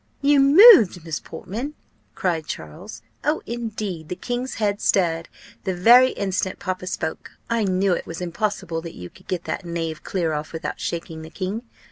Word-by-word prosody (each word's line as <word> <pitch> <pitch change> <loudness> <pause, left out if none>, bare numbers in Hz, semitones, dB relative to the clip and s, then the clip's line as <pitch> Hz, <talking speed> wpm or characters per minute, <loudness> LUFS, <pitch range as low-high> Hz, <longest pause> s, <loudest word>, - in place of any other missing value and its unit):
"You 285 0 +5
moved, 275 - +8
Miss 160 -3 -3
Portman!" 250 +10 -6 0.4
cried 165 -4 -1
Charles: 185 +8 -8 0.2
"Oh, 300 +2 0
indeed! 215 -8 -5
the - - -3
king's 245 +5 -4
head 205 -2 -1
stirred, 170 -3 +1 0.3
the 190 -2 -2
very 240 +8 +7
instant 190 -1 -2
papa 185 -1 -4
spoke. 160 -3 -4 0.2
I 230 -2 +1
knew 190 0 +2
it - - -3
was 165 - -6
impossible 180 -2 -2
that 165 0 -9
you 90 0 -9
could - - -20
get 175 -2 -2
that - - -4
knave 165 -2 -4
clear 170 -5 -1
off 150 +2 -4
without 160 +1 -5
shaking 165 -1 -4
the 160 - -9
king. 190 +6 -4
185 Hz, 170 wpm, -23 LUFS, 165-225 Hz, 0.4 s, moved